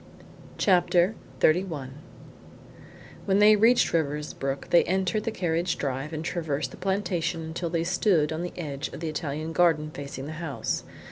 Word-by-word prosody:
CHAPTER 180 0 +3 0.3
XXXI 155 -5 +2 1.4
When 195 -1 +3
they 210 +1 +7
reached 230 +4 +4
Riversbrook 150 -3 -2
they 170 - +6
entered 190 +3 0
the 225 - 0
carriage 170 -3 -1
drive 135 +2 -3
and 160 0 -4
traversed 150 -6 -2
the - - -11
plantation 180 -4 -1
until 165 +2 -4
they 165 -1 0
stood 170 -3 +2
on 160 - -3
the 180 - -6
edge 145 -3 -4
of - - -7
the 165 -1 -3
Italian 155 +1 -4
garden 160 -3 +3
facing 140 -2 -7
the 150 - -6
house. 160 -5 -2
165 Hz, 150 wpm, -27 LUFS, 150-180 Hz, 1.4 s, they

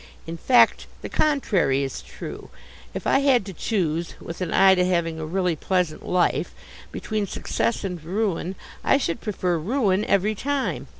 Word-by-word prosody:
In 165 - -5
fact 245 +9 +4 0.2
the - - -5
contrary 195 - +1
is 135 - -4
true. - - -9 0.4
If - - -6
I - - +4
had 270 -7 +3
to 195 - -7
choose 170 -3 -1
with 165 +2 -8
an 180 - -2
eye 190 0 +6
to 180 -1 +2
having 170 -3 0
a 155 - -4
really 180 0 0
pleasant 180 -1 -1
life 180 -1 0 0.4
between 215 -2 -3
success 230 - -2
and 180 -5 -4
ruin, 190 0 -2 0.3
I - - +4
should 170 -11 -2
prefer 185 -5 -1
ruin 205 - +1
every 200 +2 +2
time. 275 +5 -2
185 Hz, 165 wpm, -24 LUFS, 170-215 Hz, 0.4 s, eye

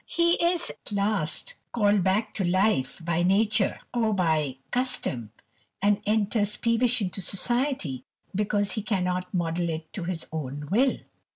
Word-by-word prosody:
He 340 0 +2
is 345 0 +1
at - - -12
last 205 - 0 0.2
called 205 -4 +3
back 195 +4 +1
to 200 - -1
life 185 -6 +1
by 170 0 +1
nature, 200 +3 +2
or 225 -3 +1
by 155 -7 +1
custom, 245 - -1 0.5
and 205 +1 +2
enters 210 -1 +1
peevish 235 0 +2
into 190 +1 -3
society, 200 - 0 0.3
because 205 0 0
he 220 - -2
cannot 180 -3 -1
model 170 -1 -1
it 160 0 -5
to 185 - -3
his 175 -2 -3
own 145 -1 -5
will. 255 +6 +3
200 Hz, 145 wpm, -26 LUFS, 170-225 Hz, 0.5 s, called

